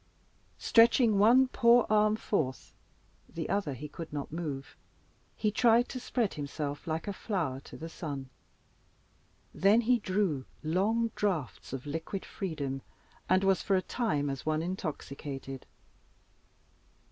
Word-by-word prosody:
Stretching 230 Hz, -2 st, +5 dB
one 245 Hz, +5 st, +6 dB
poor 240 Hz, -1 st, +5 dB
arm 215 Hz, 0 st, +4 dB
forth 155 Hz, -12 st, -2 dB, 0.6 s
the 165 Hz, -, -4 dB
other 190 Hz, -8 st, 0 dB
he 150 Hz, +4 st, -7 dB
could 165 Hz, +2 st, -8 dB
not 145 Hz, -1 st, -5 dB
move 150 Hz, -4 st, -5 dB, 0.6 s
he 215 Hz, -, 0 dB
tried 235 Hz, +2 st, +4 dB
to 255 Hz, -, -5 dB
spread 240 Hz, -4 st, -1 dB
himself 145 Hz, 0 st, -5 dB
like 160 Hz, +3 st, -2 dB
a 200 Hz, -, -2 dB
flower 170 Hz, -, -2 dB
to -, -, -12 dB
the 165 Hz, -, -6 dB
sun. 140 Hz, -5 st, -6 dB, 1.2 s
Then 200 Hz, +8 st, +4 dB
he 245 Hz, +1 st, +3 dB
drew 185 Hz, -, 0 dB, 0.2 s
long 215 Hz, +8 st, +1 dB
draughts 180 Hz, -, -2 dB
of 135 Hz, 0 st, -5 dB
liquid 160 Hz, +6 st, -4 dB
freedom, 145 Hz, -8 st, -4 dB, 0.5 s
and 185 Hz, +1 st, +4 dB
was 195 Hz, -1 st, +3 dB
for 195 Hz, -, +1 dB
a 185 Hz, -, +3 dB
time 150 Hz, -, -1 dB
as 135 Hz, -, -5 dB
one 155 Hz, 0 st, 0 dB
intoxicated. 140 Hz, -6 st, -5 dB
175 Hz, 135 wpm, -30 LUFS, 145-215 Hz, 1.2 s, one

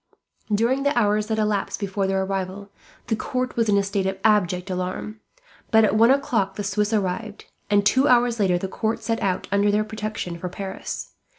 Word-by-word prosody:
During 235 Hz, +6 st, +2 dB
the 285 Hz, -1 st, +1 dB
hours 210 Hz, -2 st, +2 dB
that 220 Hz, -1 st, -1 dB
elapsed 210 Hz, -2 st, -1 dB
before 195 Hz, -1 st, -1 dB
their 190 Hz, 0 st, +1 dB
arrival, 195 Hz, +1 st, -4 dB, 0.3 s
the 225 Hz, -, 0 dB
court 255 Hz, +3 st, -3 dB
was 230 Hz, -2 st, +1 dB
in 200 Hz, -, +4 dB
a 200 Hz, -, +3 dB
state 195 Hz, -1 st, -1 dB
of 190 Hz, 0 st, -2 dB
abject 185 Hz, -3 st, +2 dB
alarm, 185 Hz, +4 st, -4 dB, 0.5 s
but 220 Hz, 0 st, +5 dB
at 200 Hz, -, +1 dB
one 230 Hz, +2 st, +6 dB
o'clock 235 Hz, -8 st, +1 dB
the 205 Hz, -, -4 dB
Swiss 205 Hz, +2 st, 0 dB
arrived; 210 Hz, +1 st, -2 dB, 0.2 s
and 205 Hz, 0 st, +3 dB
two 260 Hz, +7 st, +4 dB
hours 240 Hz, -2 st, +3 dB
later 185 Hz, -3 st, +3 dB
the 190 Hz, -, -3 dB
court 220 Hz, +4 st, -2 dB
set 225 Hz, -1 st, -1 dB
out, 185 Hz, -2 st, -1 dB
under 200 Hz, +1 st, +3 dB
their 210 Hz, +1 st, +2 dB
protection, 215 Hz, -5 st, -5 dB
for 180 Hz, -, -4 dB
Paris. 190 Hz, +1 st, -6 dB
205 Hz, 195 wpm, -23 LUFS, 195-220 Hz, 0.5 s, one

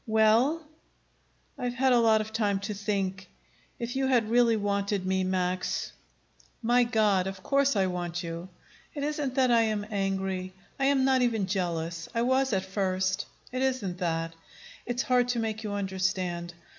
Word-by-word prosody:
"Well?" 225 Hz, +9 st, +3 dB, 1.0 s
"I've 245 Hz, -1 st, -2 dB
had 260 Hz, 0 st, +3 dB
a 240 Hz, -, +5 dB
lot 220 Hz, -2 st, +4 dB
of 215 Hz, 0 st, -7 dB
time 205 Hz, -3 st, +1 dB
to 210 Hz, +1 st, -3 dB
think. 195 Hz, -2 st, -2 dB, 0.5 s
If 240 Hz, +1 st, -4 dB
you 265 Hz, 0 st, +1 dB
had 235 Hz, -4 st, +2 dB
really 235 Hz, -1 st, +4 dB
wanted 200 Hz, -1 st, -1 dB
me, 190 Hz, 0 st, +1 dB
Max 185 Hz, 0 st, -1 dB, 0.4 s
" -, -, -32 dB
"My 245 Hz, 0 st, +6 dB
God, 210 Hz, -5 st, +2 dB
of 190 Hz, -1 st, -6 dB
course 275 Hz, -2 st, +2 dB
I 195 Hz, -2 st, +3 dB
want 175 Hz, -1 st, -3 dB
you!" 170 Hz, +2 st, -6 dB, 0.5 s
"It 285 Hz, -, -3 dB
isn't 290 Hz, -3 st, -2 dB
that 260 Hz, -2 st, +3 dB
I 230 Hz, -1 st, +5 dB
am 215 Hz, -2 st, 0 dB
angry. 190 Hz, -2 st, -2 dB, 0.3 s
I 270 Hz, -, +2 dB
am 270 Hz, -1 st, +3 dB
not 265 Hz, -1 st, +3 dB
even 225 Hz, -5 st, +1 dB
jealous. 170 Hz, -3 st, -2 dB
I 230 Hz, -, +2 dB
was 260 Hz, +1 st, +2 dB
at 190 Hz, -2 st, 0 dB
first. 190 Hz, -1 st, -1 dB, 0.2 s
It 255 Hz, +1 st, -2 dB
isn't 250 Hz, -9 st, -1 dB
that. 165 Hz, -2 st, -1 dB, 0.5 s
It's 245 Hz, +1 st, -1 dB
hard 250 Hz, -1 st, +3 dB
to 245 Hz, -1 st, 0 dB
make 220 Hz, -1 st, -2 dB
you 210 Hz, -1 st, -3 dB
understand. 185 Hz, -3 st, -2 dB
205 Hz, 170 wpm, -28 LUFS, 185-245 Hz, 1.0 s, My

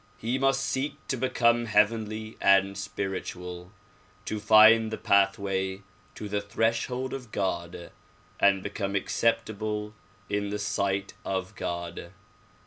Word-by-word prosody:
He 120 Hz, +4 st, -2 dB
must 135 Hz, 0 st, +2 dB
seek 135 Hz, +3 st, -2 dB
to -, -, +1 dB
become 120 Hz, -2 st, +2 dB
heav 105 Hz, 0 st, +5 dB
enly 110 Hz, -1 st, -6 dB
and 100 Hz, 0 st, +4 dB
spiritual; 95 Hz, -2 st, -5 dB, 0.5 s
to 110 Hz, -, -3 dB
find 110 Hz, +1 st, +7 dB
the 110 Hz, -, -4 dB
pathway 95 Hz, -1 st, +1 dB, 0.3 s
to 105 Hz, -, -6 dB
the 105 Hz, 0 st, -1 dB
threshold 115 Hz, +4 st, -1 dB
of 125 Hz, -5 st, -7 dB
God 85 Hz, -3 st, -3 dB, 0.5 s
and 95 Hz, -1 st, +4 dB
Ijecome 100 Hz, -1 st, -2 dB
acceptable 105 Hz, 0 st, -1 dB, 0.3 s
in 100 Hz, 0 st, -1 dB
the 105 Hz, -, -2 dB
sight 100 Hz, -1 st, -1 dB
of 95 Hz, 0 st, -3 dB
God. 85 Hz, -4 st, -5 dB
105 Hz, 125 wpm, -27 LUFS, 95-115 Hz, 0.5 s, find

